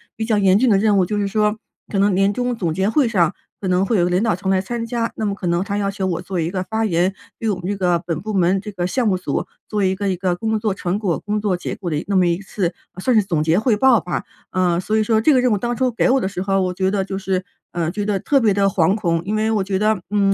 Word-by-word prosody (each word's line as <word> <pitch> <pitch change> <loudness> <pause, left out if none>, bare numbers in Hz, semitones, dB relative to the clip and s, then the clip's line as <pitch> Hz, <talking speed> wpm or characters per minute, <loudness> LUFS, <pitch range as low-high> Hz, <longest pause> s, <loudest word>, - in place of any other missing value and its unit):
比 220 - -3
较 220 -2 +1
严 195 -1 +4
峻 250 +3 +3
的 205 - +5
任 205 0 +3
务， 185 - +3
就 210 +3 -2
是 200 - 0
说， 210 +1 +1 0.3
可 195 - 0
能 200 0 +3
年 195 +1 +3
终 245 +2 -1
总 170 -7 -2
结 190 +4 0
会 270 +2 +3
上 175 -7 +2 0.3
可 190 - -3
能 180 +1 +2
会 225 - 0
有 - - +3
一 175 - +3
个 - - 0
领 180 +2 +1
导 225 -6 +2
层 190 +2 -4
来 190 - +3
参 230 +3 -4
加， 230 0 -1
那 220 - -2
么 200 - 0
可 190 - -5
能 170 +1 +1
他 200 +1 -3
要 200 -1 0
求 195 -1 -3
我 175 -2 -1
做 185 0 -5
一 165 0 -1
个 185 -1 -2
发 220 +4 -2
言， 180 -1 +1 0.3
对 225 - -1
我 200 - +1
们 175 - -8
这 205 - -1
个 180 -2 +2
本 165 -3 -2
部 215 +2 -4
门 185 0 +2
这 210 - -7
个 180 -2 -2
项 235 +6 0
目 195 - +2
组 145 -6 -2 0.2
做 210 -1 -1
一 190 0 +2
个 200 +1 -2
一 185 - 0
个 180 -1 0
工 220 +4 -1
作 210 -2 0
成 190 +1 -2
果、 185 -7 0
工 210 0 -2
作 205 -3 0
结 175 - -5
果 180 - -5
的 155 - -1
一 150 - -3
那 200 - +1
么 180 - +4
一 170 0 0
次 185 -3 -2 0.2
呃， 185 - -11
算 255 +4 +2
是 215 - +5
总 170 -5 -1
结 160 +2 +2
汇 220 0 +2
报 250 -1 +5
吧。 175 +2 -3 0.3
呃， 180 -2 +1
所 215 +3 0
以 - - +3
说 220 0 +2
这 300 - +4
个 260 - +4
任 250 - +2
务 210 - +2
当 240 +4 -2
初 255 0 +2
给 235 - +1
我 265 +1 +4
的 - - 0
时 190 -2 -4
候， 195 0 +1
我 180 -1 -1
觉 190 +1 0
得 195 -2 0
就 195 -1 -4
是 190 -1 -2 0.3
呃， 170 -2 -1
觉 205 +3 -3
得 205 -2 0
特 275 +8 +2
别 215 -3 +3
地 200 0 +2
惶 185 -1 +2
恐， 170 -6 0
因 205 - -2
为 220 +1 +1
我 210 -3 +1
觉 190 0 -1
得， 215 +1 +2
嗯， 200 -1 +2
195 Hz, 345 characters per minute, -20 LUFS, 180-215 Hz, 0.3 s, 的